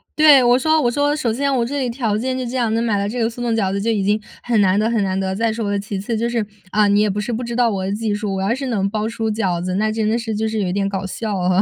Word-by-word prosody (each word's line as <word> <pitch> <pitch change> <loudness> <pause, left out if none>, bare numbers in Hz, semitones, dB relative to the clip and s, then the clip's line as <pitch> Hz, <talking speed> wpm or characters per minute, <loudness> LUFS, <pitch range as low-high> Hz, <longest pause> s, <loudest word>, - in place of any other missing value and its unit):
对 310 - +3
啊。 - - +10
对， 270 -3 +7
我 245 0 +5
说 315 +3 +3
我 240 - +2
说 290 +3 +1
首 245 -7 -1
先 280 +3 0
我 245 -3 +1
这 285 +4 -3
里 255 -2 -1
条 230 -4 -1
件 255 +3 -2
就 255 - -3
这 240 +2 -5
样， 235 -3 +1
能 230 +1 +1
买 220 -3 +1
到 200 - -1
这 240 +4 -4
个 225 - +2
速 235 +1 -9
冻 240 -1 0
饺 195 -4 0
子 200 +1 -2
就 225 - -1
已 210 -3 0
经 210 +2 +1 0.2
很 235 -3 +1
难 190 0 +3
得 215 +1 +1
很 225 -3 +1
难 190 0 -1
得， 190 0 -2
再 225 +2 +1
说 220 -2 -3
了 200 - 0
其 200 0 -5
次 220 +4 -3
就 235 +2 0
是 235 -3 -1 0.3
嗯， 205 0 +4
你 205 - +4
也 210 - +2
不 200 +1 -2
是 215 +3 -3
不 235 +3 -3
知 235 0 -4
道 245 -1 +3
我 195 -3 -2
的 195 - -2
技 215 0 -1
术， 205 -1 -2
我 190 - -2
要 195 +4 +1
是 265 +2 -4
能 205 -6 0
包 215 +1 -2
出 225 -1 -2
饺 190 -6 -1
子， 185 +1 -2
那 215 +2 +1
真 220 -1 -1
的 220 +2 +1
是 225 -2 -3
就 220 +1 -1
是 220 0 -2
有 185 -2 -1
点 195 +1 0
搞 195 0 -3
笑 210 +2 -3
啊。 180 +1 +2
220 Hz, 375 characters per minute, -20 LUFS, 200-235 Hz, 0.3 s, 啊